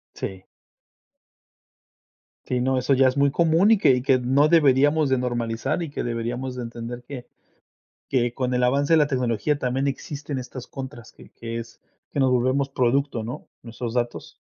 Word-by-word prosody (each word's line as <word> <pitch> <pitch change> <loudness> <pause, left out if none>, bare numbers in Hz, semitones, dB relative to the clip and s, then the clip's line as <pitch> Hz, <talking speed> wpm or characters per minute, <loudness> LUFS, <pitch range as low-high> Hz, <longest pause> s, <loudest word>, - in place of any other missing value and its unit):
Sí. 95 -1 -6 2.0
Sí, 125 -1 -1
no, 130 +1 +1
eso 130 +2 +2
ya 130 0 +5
es 130 - 0
muy 140 0 +3
común 170 +6 +3
y 225 - +6
que 190 - +4
y 125 -1 +2
que 135 0 +3
no 135 +4 +3
deberíamos 145 -1 +4
de 130 - +2
normalizar, 120 +5 -2
y 160 - -5
que 140 - -4
deberíamos 120 +2 -3
de 125 - -5
entender 120 +1 -7
que 130 -4 -8 0.8
que 120 -3 +1
con 125 0 -2
el 125 - +1
avance 140 +5 +3
de - - +6
la 150 -2 +4
tecnología 130 +1 0
también 130 +1 -1
existen 140 0 -4
estas 130 0 -8
contras, 130 -4 -9
que - - -17
que 115 0 -6
es 115 0 -9 0.3
que 140 - -2
nos 130 -1 +3
volvemos 130 +3 +1
producto, 130 -1 0
¿no?, 120 +3 -7 0.2
nuestros 115 0 -6
datos. 120 -1 -3
130 Hz, 180 wpm, -24 LUFS, 120-140 Hz, 2.0 s, y